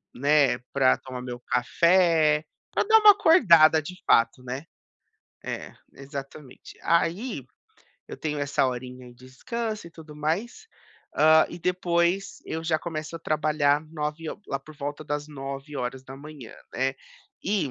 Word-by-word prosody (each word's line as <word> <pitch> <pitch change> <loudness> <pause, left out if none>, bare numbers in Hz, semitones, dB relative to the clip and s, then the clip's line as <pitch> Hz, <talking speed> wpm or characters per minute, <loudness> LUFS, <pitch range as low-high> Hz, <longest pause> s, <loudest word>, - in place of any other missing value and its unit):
né, 140 -1 +3 0.2
pra 135 -2 +4
tomar 130 -1 -8
meu 125 -1 -7
café. 160 +3 +3 0.3
Pra - - +2
dar 445 +1 +6
uma 425 -1 +9
acordada 170 - +6
de 180 +5 -8
fato, 115 +2 +3
né. 130 +3 -5 0.8
É. - - -6 0.2
Exatamente. 135 0 -10
Aí 170 +8 0 0.6
eu - - -7
tenho 150 -2 -3
essa 140 -1 +1
horinha 125 0 -6
de 125 +1 -16
descanso 215 - -5
e 170 - -11
tudo 160 -2 -13
mais. 195 - -3 0.5
Hã, 155 +1 +6
e 170 - -8
depois 175 +1 0
eu 160 0 -4
já 160 -1 +1
começo 155 -1 -6
a - - -9
trabalhar 150 -2 +1
9 155 0 -4
ho - - -9
lá 135 - -2
por 155 +3 -15
volta 145 +1 -5
das 145 0 -4
9h, 135 -1 -7 0.2
né. 135 +1 0 0.5
E 190 -9 0
150 Hz, 140 wpm, -26 LUFS, 135-170 Hz, 0.8 s, uma